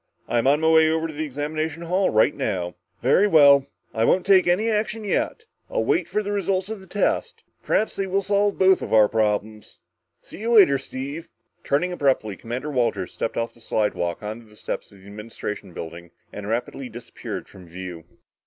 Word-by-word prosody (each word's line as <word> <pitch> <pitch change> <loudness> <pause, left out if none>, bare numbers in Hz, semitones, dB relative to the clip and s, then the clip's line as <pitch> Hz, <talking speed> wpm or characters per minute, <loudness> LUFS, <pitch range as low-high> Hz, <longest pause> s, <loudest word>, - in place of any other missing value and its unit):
"I'm 120 +2 +1
on 145 +3 +4
my 160 - +2
way 160 -1 +6
over 160 0 0
to 160 - -8
the 155 +2 -3
examination 155 +3 -3
hall 185 +3 +1
right 110 0 +3
now." 90 -2 -2 0.3
"Very 205 - +4
well. 140 -6 +6 0.3
I 110 - 0
won't 180 +9 +3
take 190 -2 +5
any 185 +6 +2
action 215 0 -1
yet. 445 - -1 0.2
I'll - - 0
wait - - +1
for 210 - -1
the 205 - -3
results 195 -1 -1
of 220 -2 -5
the 190 - -15
tests. 205 +3 -1 0.2
Perhaps 220 - 0
they 195 - -1
will 195 +1 0
solve 200 0 +1
both 190 0 +4
our 110 -1 +4
problems. 110 0 -2 0.4
See - - -12
you 230 +2 0
later, 145 -11 +7
Steve." 140 +4 -6 0.3
Turning 170 +6 0
abruptly, 135 - 0
Commander 120 +8 -5
Walters 125 -4 -1
stepped - - -3
off 115 0 -2
the 115 - -20
slidewalk 105 -5 -1
onto 110 +2 -6
the 105 - -18
steps - - -5
of 100 - -16
the 95 - -18
Administration 105 -1 -7
Building 85 +1 -8 0.2
and 105 0 -7
rapidly 125 +3 -3
disappeared 120 +1 -7
from 90 -3 -14
view. 90 -1 -8
140 Hz, 190 wpm, -23 LUFS, -, 0.4 s, later